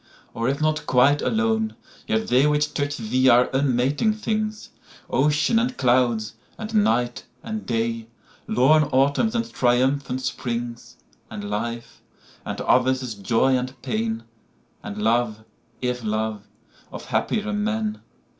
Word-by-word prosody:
Or, 115 +2 -1
if 140 - -1
not 155 0 0
quite 140 +3 +4
alone, 225 -1 0 0.3
yet 220 0 +1
theyWhich 150 - +2
touch 145 +1 -2
thee 130 +3 +2
are 125 +1 +5
unmating 135 - +1
things—Ocean, 215 - -1
and 250 +2 -1
Clouds, 120 -4 +2 0.2
and 220 0 -6
Night, 120 - +1 0.2
and 220 -1 -5
Day; 115 -1 -1 0.4
Lorn 150 +5 +4
Autumns 140 - +2
and 230 0 -2
triumphant 130 +1 +1
Springs; 120 -1 -4 0.3
And 105 -1 -6
life, 115 +3 -4 0.4
and - - -5
others' 130 -1 +2
joy 115 +6 +2
and 130 +1 -3
pain, 115 -2 -2 0.6
And 105 +1 -7
love, 110 -1 +1 0.4
if 125 -1 -2
love, 110 0 -2 0.4
of - - -8
happier 215 -1 -1
men. 215 +1 -2
130 Hz, 120 wpm, -23 LUFS, -, 0.6 s, are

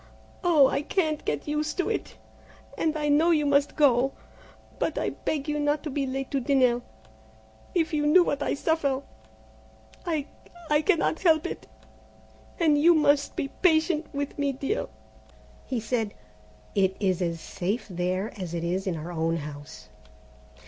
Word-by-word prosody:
"Oh, 325 -6 +6
I 280 - 0
can't 310 -1 -1
get 145 - -2
used 300 +1 -2
to 365 - 0
it, - - -3 0.6
and 315 -1 0
I 300 -1 -1
know 300 +4 +4
you 305 -3 +3
must 285 0 +2
go, 270 -2 +3 0.7
but - - -1
I - - 0
beg 295 -1 -3
you 300 0 -1
not 290 0 0
to 305 - -4
be 275 0 -1
late 270 +1 -4
to 275 - +1
dinner. 250 -2 +2 0.9
If 330 -2 +1
you 295 -1 +1
knew 355 +4 +7
what 285 -4 -2
I - - 0
suffer! 285 -3 0 1.0
I 315 -5 -1 0.5
I 295 0 +4
cannot 330 -2 +1
help 320 -4 +4
it, - - -6 0.9
and 305 -4 +4
you 340 +2 +6
must 290 -2 +2
be 275 - -2
patient 320 -2 +3
with 285 +1 -4
me, 285 -1 +1
dear." 275 - -2 0.8
He 255 -3 -1
said, 220 -1 -2 0.6
"It 190 -1 +1
is 190 -3 +1
as 170 -2 -1
safe 195 +8 -3
there 185 +2 -2
as 175 -2 -4
it 170 - -3
is 185 +3 -1
in 180 - 0
our 160 +3 -6
own 165 0 0
house." 145 -3 -9
285 Hz, 160 wpm, -27 LUFS, 205-310 Hz, 1.0 s, knew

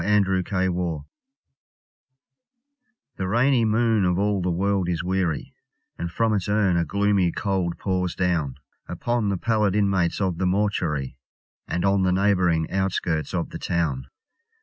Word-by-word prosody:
Spleen 105 0 +4
The 90 -4 -1 2.2
rainy 120 +3 +3
moon 110 -1 +2
of 90 -1 +1
all 100 0 +1
the 90 - -1
world 95 +1 0
is 85 -1 -1
weary, 90 -4 -1 0.5
And 85 - -3
from 115 +4 +1
its 100 -1 -1
urn 100 -3 +2
a 85 - +2
gloomy 100 -3 +1
cold 95 -3 -1
pours 90 -2 -1
down, 85 -8 0 0.3
Upon 120 -3 -1
the 100 - 0
pallid 105 0 +1
inmates 95 -4 +1
of 95 -4 -1
the 95 - +1
mortuary, 90 -9 -1 0.5
And 85 +3 -1
on 100 0 +3
the 95 -1 +2
neighbouring 90 -4 +2
outskirts 90 -4 -1
of 85 - -2
the - - -6
town. 75 -7 -1
95 Hz, 140 wpm, -24 LUFS, 85-100 Hz, 2.2 s, Spleen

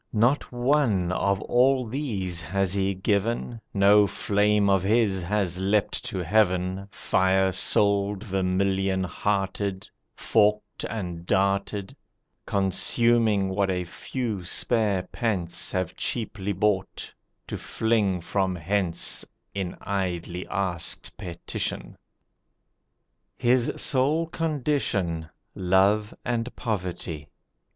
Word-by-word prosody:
Not 120 +6 +2
one 120 -8 +2
of 100 +1 +1
all 130 +2 +3
these 105 - -2
has 95 +2 0
he 100 -1 0
given, 110 +4 -1
No 100 +1 +5
flame 105 +1 +2
of 95 -2 +3
his 100 -1 +2
has 90 -1 -1
leapt 100 +2 0
to 105 - -3
Heaven 95 0 +1
Firesouled, 95 +2 +2
vermilion 95 -1 0
hearted, 95 +1 -2 0.3
Forked, 105 -1 +1
and 90 -6 -5
darted, 100 0 0 0.5
Consuming 105 +1 +2
what 95 0 0
a 90 -1 0
few 110 +2 -4
spare 105 +1 +1
pence 95 -4 -2
Have 95 -2 -2
cheaply 105 -3 -2
bought, 100 0 -1 0.3
to - - -5
fling 105 -5 0
from 95 +1 -1
hence 90 0 0 0.3
In 95 -3 -4
idly 90 -2 -3
asked 90 -3 -2
petition. 85 -1 -4 1.4
His 125 0 +2
sole 145 +5 +2
condition 135 - -1 0.2
Love 95 +3 +2
and 120 0 -2
poverty. 90 -7 -3
100 Hz, 95 wpm, -26 LUFS, 95-110 Hz, 1.4 s, No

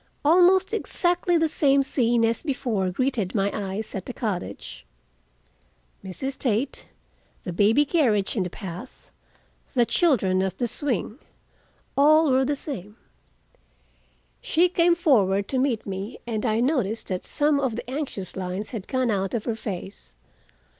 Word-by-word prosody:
Almost 365 +5 +5
exactly 355 -4 +1
the 325 0 +2
same 280 -2 +3
scene 240 -3 +2
as 230 0 0
before 245 - -1
greeted 225 -1 -1
my 200 -1 +1
eyes 200 +1 -4
at 195 - -5
the 250 - -5
cottage. 100 - -5 1.2
Mrs. 260 +8 -5
Tate, 245 +2 -1 0.6
the 180 - -5
baby 220 +11 +4
carriage 245 - +1
in 210 - 0
the 180 - -2
path, 190 +7 -9 0.6
the 240 -2 +4
children 210 - +2
at 190 -1 -2
the 245 - -1
swing—all 290 - -1
were 260 +1 +3
the 290 +2 0
same. 215 - -7 1.5
She 350 +3 +2
came 345 0 +3
forward 200 - +2
to 260 - 0
meet 255 -4 0
me, 195 +4 -5
and 225 0 -2
I 220 +1 +1
noticed 240 -5 -1
that 185 -1 -3
some 295 -1 +2
of 260 -5 -1
the 235 - -6
anxious 255 - -5
lines 190 +2 -4
had 215 -5 -6
gone 255 -3 0
out 195 +1 -1
of 220 - -2
her 230 - -1
face. 190 - -7
235 Hz, 145 wpm, -25 LUFS, 195-280 Hz, 1.5 s, Almost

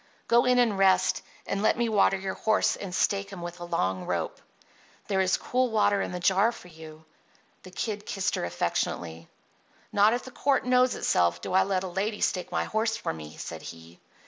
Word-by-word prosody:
Go 235 +1 +4
in 250 0 +3
and 225 -5 +2
rest, 185 -1 +3 0.2
and 200 - -2
let 215 - +2
me 235 0 +1
water 205 -3 +3
your 190 0 -4
horse 220 -1 +1
and 195 - -7
stake 200 +1 0
him 190 -3 -8
with 175 0 -6
the 175 -1 -8
long 95 - -1
rope. 85 -2 -3 0.7
There 190 -2 +1
is 185 0 +2
cool 255 0 0
water 205 -2 +2
in - - -3
the 180 - -4
jar 190 +5 +3
for 205 -6 -13
you." 160 -1 -13 0.6
The 185 - -12
Kid 210 +3 -4
kissed 195 -2 -1
her - - -2
affectionately. 85 -1 -2 0.7
"Not 205 +2 +5
if 245 - -4
the 260 - -10
court 275 +1 +1
knows 250 0 +3
itself 85 0 +1
do 135 - -5
I 190 - +5
let 190 -1 0
a - - -3
lady 200 +4 -2
stake 180 - -1
my - - 0
horse 220 +1 -1
for - - -3
me," 75 -1 -10
said - - -7
he. 85 +1 -11
195 Hz, 205 wpm, -27 LUFS, 170-220 Hz, 0.7 s, Not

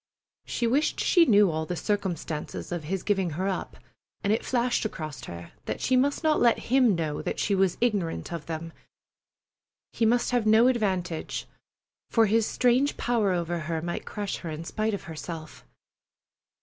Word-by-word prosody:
She 240 - -1
wished 275 +7 +1
she 345 -3 +5
knew 205 - +5
all 160 0 -2
the 180 - -2
circumstances 175 -7 -3
of 170 -3 -3
his 190 +3 -2
giving 195 -4 +1
her 190 +2 0
up, 195 - -3 0.5
and 200 - +2
it 225 - 0
flashed 245 -1 +1
across 155 - -5
her 85 0 -9
that - - -3
she 260 - +2
must 280 +5 +2
not 310 -1 +3
let 235 -1 +5
him 250 -5 +3
know 155 -3 -2
that - - -3
she 205 - +1
was 190 -2 +2
ignorant 200 -9 -1
of 165 -3 -6
them. 165 0 -5 1.2
He 225 - +2
must 240 +2 +2
have 240 -3 +1
no 220 +2 +6
advantage, 190 -9 -1 0.6
for 225 -1 +4
his 220 +1 +2
strange 255 +3 +2
power 230 -5 +1
over 175 -1 -1
her 165 0 -2
might 170 +2 -4
crush 205 -2 -4
her 170 - -7
in 155 +1 -5
spite 215 +4 -1
of - - -8
herself. 160 - -8
200 Hz, 175 wpm, -27 LUFS, 165-235 Hz, 1.2 s, no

